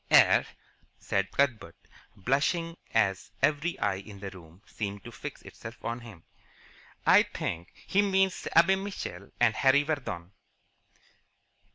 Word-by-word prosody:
"Er - - +6 0.3
" - - -37
said 95 0 +1
Cuthbert, 130 -6 0 0.4
blushing 145 - 0 0.2
as 95 -2 +1
every 150 +4 +2
eye 100 -2 0
in 100 0 -11
the 100 -1 -6
room 85 +1 -15
seemed 100 -2 -5
to - - -9
fix - - -8
itself 110 +1 -10
on 120 +1 -2
him, 110 -8 -12 0.8
"I - - +8
think 85 +2 -4
he 200 - +3
means 190 -2 +1
Abe 190 +4 +6
Mitchell 145 - -6
and 120 -2 +4
Harry 135 +4 +4
Vardon." 125 - -4
120 Hz, 135 wpm, -29 LUFS, 100-160 Hz, 0.8 s, I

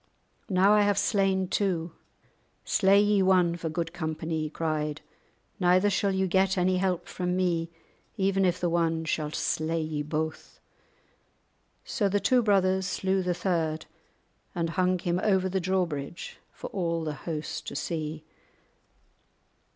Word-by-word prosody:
"Now 195 +2 +4
I 210 - +5
have 205 -1 +2
slain 195 -3 +1
two; 180 -4 -1 0.7
slay 195 0 +4
ye 205 -1 +3
one 180 -2 +3
for 165 -1 -4
good 165 +1 -3
company," 160 -1 -3
he 155 - -3
cried; 155 -1 -2 0.6
"neither 185 +2 +4
shall 200 +1 +1
ye 190 0 +1
get 190 +1 +2
any 185 +1 +2
help 180 -2 -1
from 180 0 -2
me 170 -3 0 0.5
even 195 -1 +2
if 180 -1 +1
the 180 - 0
one 165 -1 0
shall 155 -1 -1
slay 155 +2 -1
ye 155 -2 -2
both." 155 +1 -4 1.3
So 205 -2 0
the 205 +1 +1
two 250 +4 +3
brothers 190 -3 +2
slew 190 +1 0
the 180 -1 -1
third, 165 -4 -1 0.7
and 165 -1 -1
hung 185 +1 +1
him 175 0 -1
over 190 -3 +2
the 190 +1 -1
drawbridge 170 -4 -3
for - - -9
all 170 -3 -1
the 155 -1 -3
host 150 +2 -5
to - - -5
see. 155 -2 -4
180 Hz, 145 wpm, -28 LUFS, 160-190 Hz, 1.3 s, I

